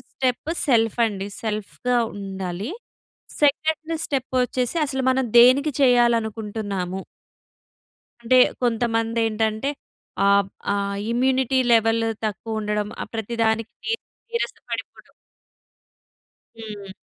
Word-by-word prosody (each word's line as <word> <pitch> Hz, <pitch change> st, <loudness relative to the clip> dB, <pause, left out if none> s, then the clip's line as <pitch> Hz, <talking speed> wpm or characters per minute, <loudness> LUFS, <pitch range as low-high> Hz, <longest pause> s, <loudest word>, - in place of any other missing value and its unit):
Step 260 Hz, +4 st, -1 dB, 0.2 s
self 225 Hz, -4 st, +3 dB
అండి. 195 Hz, -2 st, -5 dB, 0.2 s
సెల్ఫ్‌గా 220 Hz, +3 st, -1 dB, 0.2 s
ఉండాలి. 195 Hz, -, -5 dB, 0.7 s
2 315 Hz, +2 st, +1 dB
స్టెప్ 265 Hz, -3 st, -2 dB
వచ్చేసి 250 Hz, +4 st, -2 dB
అసలు 265 Hz, -1 st, -2 dB
మనం 265 Hz, 0 st, +1 dB, 0.2 s
దేనికి 270 Hz, +5 st, +6 dB
చెయ్యాలనుకుంటున్నాము. 220 Hz, -6 st, +1 dB, 1.2 s
అంటే 255 Hz, +2 st, +4 dB, 0.3 s
కొంతమంది 230 Hz, -1 st, +1 dB
ఏంటంటే 220 Hz, +4 st, -1 dB, 0.6 s
ఆహ్, 200 Hz, 0 st, +4 dB, 0.3 s
ఆహ్, 200 Hz, 0 st, -1 dB
ఇమ్యూనిటీ 260 Hz, +1 st, +2 dB
లెవెల్ 225 Hz, 0 st, +3 dB, 0.2 s
తక్కువ 220 Hz, +2 st, -3 dB
ఉండడం 210 Hz, 0 st, -1 dB
ఆహ్, -, -, -6 dB
ప్రతి 225 Hz, +1 st, -3 dB
దానికి 220 Hz, 0 st, 0 dB, 0.6 s
నీరసపడి‌పొడడం. 470 Hz, -, -5 dB, 1.5 s
హ్మ్. 205 Hz, -3 st, -8 dB
225 Hz, 90 wpm, -23 LUFS, 210-255 Hz, 1.5 s, దేనికి